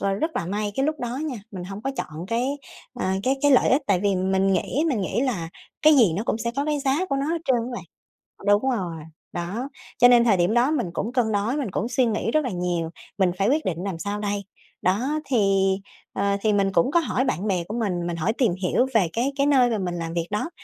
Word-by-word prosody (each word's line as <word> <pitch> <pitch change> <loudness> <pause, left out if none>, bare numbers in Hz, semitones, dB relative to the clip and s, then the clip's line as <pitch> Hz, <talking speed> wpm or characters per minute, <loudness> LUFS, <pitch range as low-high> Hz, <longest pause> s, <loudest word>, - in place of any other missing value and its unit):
ơ, 195 0 0
rất 315 +11 -1
là 170 - -2
may 205 +2 -2
cái 270 - +1
lúc 310 0 -2
đó 245 +1 -3
nha, 280 -5 -3
mình 185 -3 -6
hổng 195 +3 -7
có 270 - -1
chọn 155 +3 -5
cái, 235 +4 0 0.5
ờ, 245 - -3 0.2
cái 265 +4 +1
cái 290 - +5
lợi 255 - +5
ích, 270 +3 +3
tại 195 -3 +2
vì 200 -1 +1
mình 190 +1 +1
nghĩ 270 - 0
mình 245 -8 0
nghĩ 195 +5 -1
là 200 -12 -1 0.3
cái 310 0 +7
gì 215 -10 +5
nó 205 - -1
cũng 225 - -1
sẽ 235 +1 -2
có 280 - 0
cái 300 -1 0
giá 280 +7 +1
của 275 - -1
nó 275 +1 -1
hết 330 +1 -1
trơn 260 -2 +3
á 235 +2 -3
bạn. 185 - -6 0.6
Đúng 205 +6 +3
rồi. 185 -9 -2 0.4
Đó, 190 +10 -3 0.3
cho 245 - +8
nên 240 -1 +6
thời 215 -5 +4
điểm 175 +4 +2
đó 245 +4 +3
mình 245 - -1
cũng 225 +7 -3
cân 240 -4 +1
đối, 210 +7 0
mình 260 -9 -2
cũng 215 +5 -2
suy 250 +1 +2
nghĩ 225 +1 -1
rất 310 +1 +2
là 250 - -2
nhiều, 175 -3 -2 0.3
mình 185 -3 +3
phải 195 +3 +2
quyết 305 +4 +2
định 165 -3 -1
làm 185 -5 -3
sao 205 +3 -3
đây. 205 -1 -2 0.4
Đó, 255 +12 +1
thì, 195 -6 +2 0.4
ờ, 200 0 0
thì 215 0 +2
mình 195 -1 +2
cũng 180 +8 +3
có 340 - +4
hỏi 260 -5 0
bạn 210 - -1
bè 185 -4 0
của 220 +3 -3
mình, 180 -6 -1
mình 170 -1 -3
hỏi 170 +7 0
tìm 235 -9 +3
hiểu 215 +8 +2
về 200 -6 +4
cái 250 +5 0
cái 280 0 +2
nơi 260 -4 +4
mà 220 - 0
mình 180 -3 -2
làm 165 -1 -4
việc 170 -1 -1
đó, 210 +10 -2
215 Hz, 260 wpm, -24 LUFS, 190-260 Hz, 0.6 s, cho